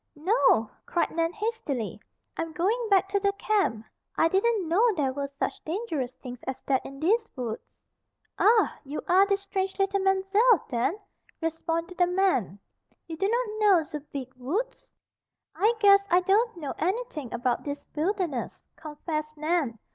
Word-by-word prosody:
"No!" 300 - +3 0.2
cried 345 - 0
Nan 330 0 0
hastily. 420 - -3 0.3
"I'm 330 -1 -4
going 435 +9 0
back 390 -1 +4
to 400 +1 +1
the 400 0 +1
camp. 395 - 0 0.3
I 330 - +4
didn't 395 0 +1
know 430 +9 +4
there 275 -5 0
were 280 +1 -3
such - - -3
dangerous 320 - -3
things 250 -2 -7
as 265 - -1
that 265 -2 +1
in 275 0 -9
these 425 +9 +2
woods." 235 -4 -4 0.8
"Ah! 440 +1 +4
You 285 +1 -5
are 380 +2 +5
de 395 -1 +2
strange 390 -1 -3
leetle 390 0 +1
Mam'zelle 385 +3 +3
den?" 245 - 0 0.4
responded 330 +2 -3
the 355 - +5
man. 360 - +1 0.5
"You 325 - -6
do 390 +5 0
not 455 -2 -1
know 395 -6 +5
ze 300 0 -6
Beeg 260 -2 -6
Woods?" 345 - -3 0.6
"I 430 +4 +3
guess 400 -1 +6
I 355 +1 +5
don't 410 +3 +2
know 295 -5 -4
anything 365 - -2
about 240 0 -1
this 285 0 -5
wilderness," 330 - -2
confessed 305 0 -5
Nan. 305 -6 0
350 Hz, 155 wpm, -27 LUFS, 295-400 Hz, 0.8 s, guess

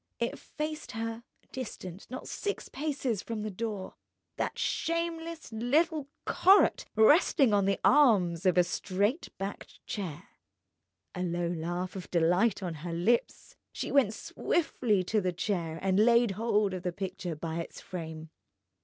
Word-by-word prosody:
It - - -2
faced 305 0 -5
her, 225 +1 -4 0.3
distant 195 -7 -7
not 255 +2 -7
six 410 -1 -4
paces 270 -7 -2
from 225 -1 -4
the 215 - -3
door—that 205 -1 -6
shameless 335 -1 -2
little 290 +7 +1 0.2
"Corot"!—resting 290 - +4
on 200 -1 +3
the 195 -1 +1
arms 195 - +4
of 180 - +3
a 180 - +7
straight 200 - -1
backed 195 +1 -7
chair. 180 -8 -5 0.9
A 180 - -4
low 175 -1 -1
laugh 175 +2 -3
of 185 - -7
delight 180 +5 +2
on 175 -2 -2
her 170 0 -4
lips, 200 +8 0 0.2
she - - -4
went 250 -7 +3
swiftly 225 - 0
to 215 +3 +1
the 185 -1 0
chair 170 -3 -2
and 190 0 +2
laid 235 -1 +5
hold 210 -1 +1
of 185 - -4
the 180 -1 -2
picture 180 -2 -4
by 160 +1 -4
its 165 - -6
frame. 160 -3 -7
205 Hz, 140 wpm, -30 LUFS, 180-245 Hz, 0.9 s, a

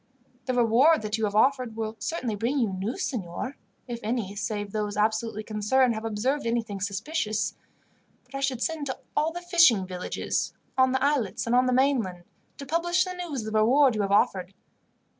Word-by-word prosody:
"The 255 - 0
reward 245 +5 +4
that 215 +1 -2
you 220 - +1
have 205 0 -3
offered 255 0 +2
will 220 0 -3
certainly 255 -9 -2
bring 235 +7 -1
you 235 -6 +2
news, 210 - -3
signor, 235 - -4 0.3
if 240 -1 -5
any, 215 -3 -2
save 205 -1 -3
those 210 -1 -2
absolutely 220 0 0
concerned, 225 +4 +2
have 220 0 -5
observed 235 +5 -1
anything 225 -4 -2
suspicious; 215 - -2 0.7
but 250 - -24
I 275 - -3
should 265 -3 -1
send 320 -3 -2
to 260 - -3 0.2
all 310 +2 +2
the 350 +1 -6
fishing 335 - +5
villages, 180 -1 -3 0.2
on 260 0 +4
the 265 0 0
islets 280 -8 0
and 235 +1 +1
on 250 +1 +4
the - - +2
mainland, 245 -9 +1 0.3
to 280 - -7
publish 345 +5 +1
the 365 - -5
news 325 -10 -5
of 220 - -5
the 215 - +3
reward 260 +4 +5
you 215 - -1
have 200 -1 -1
offered. 190 -2 +2
230 Hz, 190 wpm, -26 LUFS, 210-275 Hz, 0.7 s, fishing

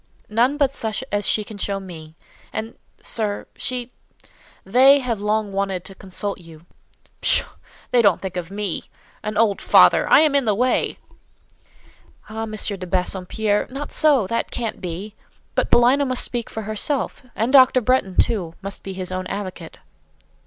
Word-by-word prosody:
"None 240 +7 +2
but 280 -2 +2
such 220 0 -3
as 205 -1 -1
she 215 - +1
can 205 0 -10
show 200 0 -2
me. 160 -4 -11 0.4
And—sir—she—they 240 +3 -1
have 240 -6 -3
long 210 0 0
wanted 195 -2 -2
to 195 - -8
consult 195 +1 -5
you." 165 -1 -15 0.6
"Pshaw! - - +3 0.5
They 245 - +5
don't 200 -5 +4
think 190 -2 -6
of 175 -2 -4
me—an 210 +1 -6
old 215 -3 +2
father! - - +5
I - - +7
am 310 -2 +3
in 280 -2 +2
the 210 -2 +2
way." 250 +4 +1 1.3
"Ah, 220 +1 -5
M. 220 - -8
de 200 -3 -2
Bassompierre—not 205 +8 -1
so—that 245 -8 +2
can't 230 -3 -4
be! 185 +4 -6 0.4
But - - 0
Paulina 250 +4 +5
must 255 -1 +1
speak 240 -2 -3
for 220 - -5
herself: 215 +7 -2
and 230 +5 -1
Dr. 260 -1 +7
Bretton, 235 -6 +1
too, 175 -7 +1
must 195 0 -5
be 195 - -7
his 185 -1 -5
own 185 0 -3
advocate." 185 -5 -6
210 Hz, 145 wpm, -22 LUFS, 190-245 Hz, 1.3 s, I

